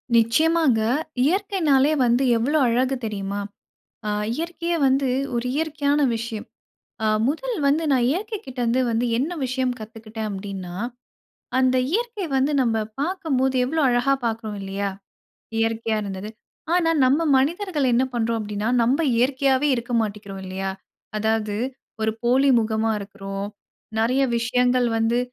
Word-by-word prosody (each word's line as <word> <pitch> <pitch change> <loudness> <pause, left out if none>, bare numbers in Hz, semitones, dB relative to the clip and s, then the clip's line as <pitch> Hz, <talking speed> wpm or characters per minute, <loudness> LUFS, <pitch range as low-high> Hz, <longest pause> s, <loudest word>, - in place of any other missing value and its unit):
நிச்சயமாங்க. 255 +2 +3 0.4
இயற்கைனாலே 315 -5 +2
வந்து 240 +3 +3
எவ்ளோ 280 +7 +1
அழகு 255 +3 +1
தெரியுமா? 200 -1 -3 0.7
ஆ - - 0 0.2
இயற்கையே 340 +3 -2
வந்து 270 +1 +2 0.3
ஒரு 235 +1 -1
இயற்கையான 295 -2 +1
விஷயம். 225 -1 -5 0.6
ஆ - - +2 0.2
முதல் 465 - -2
வந்து 305 +4 +2
நான் 245 -2 +3
இயற்கை 425 +6 -2
கிட்ட 260 -1 -9
இருந்து 240 +2 +2
வந்து, 230 +1 +1
என்ன 285 +7 0
விஷயம் 255 0 -1
கத்துக்கிட்டேன் 220 0 -6
அப்படின்னா, 190 -2 -6 0.8
அந்த 260 0 +3 0.2
இயற்கை 455 -3 -1
வந்து 270 +3 +2
நம்ப 225 -3 +1 0.2
பார்க்கம்போது 285 -6 0
எவ்ளோ 315 +5 -1
அழகா 245 +3 +3
பார்க்குறோம் 220 -2 -3
இல்லையா? 195 +1 -2 0.7
இயற்கையா 225 0 0
இருந்தது. 195 +1 -5 0.4
ஆனா 335 -2 +3
நம்ம 275 +5 +3 0.2
மனிதர்கள் 310 +1 0
என்ன 245 +2 +4
பண்றோம் 230 -1 0
அப்டிண்ணா 210 0 -3 0.2
நம்ப 255 +6 +2 0.2
இயற்கையாவே 265 +3 +2
இருக்க 235 +1 -5
மாட்டிக்கிறோம் 200 -2 -5
இல்லையா, 190 +1 -3 0.5
அதாவது 215 -1 0 0.5
ஒரு 220 0 +2
போலி 260 +3 +4
முகமா 220 0 0
இருக்கிறோம். 195 0 -6 0.5
நெறைய 250 +4 +2 0.2
விஷயங்கள் 245 +1 +2
வந்து 230 +2 +2
245 Hz, 130 wpm, -23 LUFS, 220-285 Hz, 0.8 s, என்ன